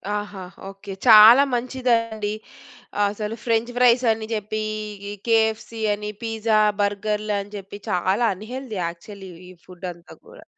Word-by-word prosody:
ఆహా! 205 -2 -5 0.3
ఓకె. 195 0 -9
చాలా 225 +4 +9
మంచిదండి. 235 -4 -1 0.7
అసలు 210 +2 -4
ఫ్రెంచ్ 230 0 0
ఫ్రైస్ 250 0 +4
అని 220 0 -3
చెప్పి, 215 0 -3 0.5
ఈ - - -5
కెఎఫ్‌సి 225 0 +1
అని 210 0 -5
పిజ్జా, 225 -1 0 0.2
బర్గర్‌లని 205 0 -2
చెప్పి 200 +1 -10
చాలా 190 +6 +1
అన్‌హేల్తీ 235 +2 -7
యాక్చువల్లి 190 +3 -8 0.2
ఈ - - -11
ఫుడ్ 180 0 -9
అంతా 170 0 -16
కూడా. - - -15
215 Hz, 125 wpm, -22 LUFS, 200-230 Hz, 0.7 s, చాలా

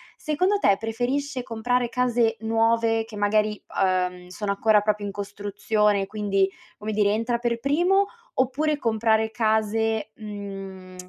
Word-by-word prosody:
secondo 365 +7 +1
te, 200 - +4
preferisce 250 +4 -2
comprare 240 +1 0
case 240 -3 +1
nuove 225 0 +2
che 220 -2 -10
magari, 210 +1 +1 0.2
uhm, 180 -1 0
sono 200 +2 -3
ancora 210 +1 +4
proprio 210 0 -1
in 200 - -3
costruzione, 205 0 0
quindi, 195 -2 +1 0.3
come 215 +1 -4
dire 205 -1 +3
entra 230 +3 0
per 235 -1 -1
primo 350 +9 +3 0.3
oppure, 295 +4 +1
comprare 220 -2 +1
case, 220 -1 0
mhmm, 195 -3 -8
220 Hz, 130 wpm, -25 LUFS, 205-235 Hz, 0.3 s, te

